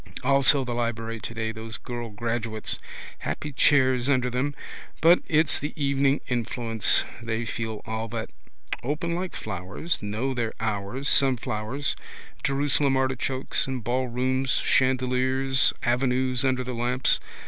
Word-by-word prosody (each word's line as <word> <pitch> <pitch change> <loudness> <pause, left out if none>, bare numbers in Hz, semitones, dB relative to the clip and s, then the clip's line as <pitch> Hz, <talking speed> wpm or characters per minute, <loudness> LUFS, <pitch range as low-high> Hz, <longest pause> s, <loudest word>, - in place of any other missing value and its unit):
Also 140 +1 +5
the 120 - -3
library 115 -1 -2
today: 110 0 -4
those 110 0 -6
girl 120 -2 -6
graduates. 115 0 -2 0.4
Happy 110 - -4
chairs 130 -2 +3
under 125 -2 +2
them. 135 +4 -1 0.4
But 170 +2 +6
it's 155 0 +2
the 150 - -4
evening 140 0 +2
influence. 115 -2 +1 0.2
They 115 0 -2
feel 110 -1 -4
all 110 0 -3
that. 115 0 -5 0.5
Open 155 +6 -2
like 180 +1 -3
flowers, 95 - -3
know 110 +6 -2
their 115 -3 -2
hours, 110 +5 -2
sunflowers, 130 0 +2 0.5
Jerusalem 140 0 +2
artichokes, 130 0 -1
in 130 -2 -3
ballrooms, 130 +2 0
chandeliers, 130 +1 +3
avenues 125 +1 +1
under 130 -1 +1
the 125 0 -5
lamps. 125 +2 +1
125 Hz, 125 wpm, -26 LUFS, 115-135 Hz, 0.5 s, But